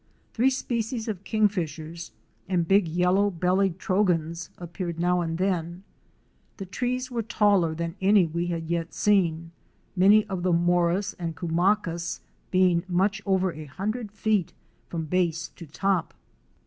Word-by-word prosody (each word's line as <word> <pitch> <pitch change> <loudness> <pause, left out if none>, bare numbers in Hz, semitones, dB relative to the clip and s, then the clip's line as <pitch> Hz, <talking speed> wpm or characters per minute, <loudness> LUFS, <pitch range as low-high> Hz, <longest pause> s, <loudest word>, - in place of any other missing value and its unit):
Three 245 +4 +3
species 235 -3 -2
of 200 -4 -4
Kingfishers 170 -6 -1 0.2
*" - - -33
and 175 -3 +1
big 195 -2 +4
Yellow 180 +4 +2
bellied 185 0 +1
Trogons" 170 -4 0
appeared 175 -1 -5
now 180 +1 +2
and 165 -1 -2
then. 180 -1 -2 0.7
The 195 - -6
trees 250 +6 -3
were 235 -1 -1
taller 205 -6 +2
than 165 0 -3
any 195 -1 +5
we 170 +2 -2
had 165 -2 -3
yet 170 0 -2
seen, 170 -5 +1 0.4
many 205 +4 +5
of 190 -4 -4
the 180 0 +1
moras 175 +3 +2
and 165 -2 -4
cumacas 170 +1 0 0.3
being 180 -2 +3
much 195 +3 +1
over 190 -1 +2
a 155 0 -8
hundred 210 - -4
feet 215 -4 0 0.4
from 165 -2 -3
base 170 0 0
to 170 - -12
top. 185 +3 -1
180 Hz, 145 wpm, -26 LUFS, 170-200 Hz, 0.7 s, any